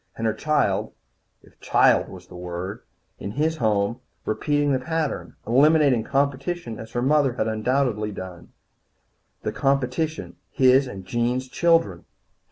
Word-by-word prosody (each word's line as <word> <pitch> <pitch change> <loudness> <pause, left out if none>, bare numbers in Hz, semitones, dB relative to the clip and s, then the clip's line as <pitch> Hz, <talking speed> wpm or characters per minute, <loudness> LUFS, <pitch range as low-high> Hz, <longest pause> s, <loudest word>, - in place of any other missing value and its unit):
And 115 - -3
her 110 - +2
child 110 -6 0 0.5
if - - -22
child - - +3
was 90 -1 -11
the 90 - -14
word 90 +2 -6 0.4
in 100 - -5
his 160 +4 0
home, 110 -1 0 0.3
repeating 145 +5 0
the 130 - +2
pattern. 160 +2 -3
Eliminating 140 -1 +4
competition 140 0 -1
as 110 0 -10
her 120 - -1
mother 140 -1 +3
undoubtedly 110 0 0
had 105 - -8
done. 90 -2 -9 0.9
The - - -1
competition 140 +4 -1
his 130 0 +4
and 95 -6 -8
Jean's 120 +5 -1
children! 165 - +1
125 Hz, 135 wpm, -24 LUFS, 105-145 Hz, 0.9 s, Eliminating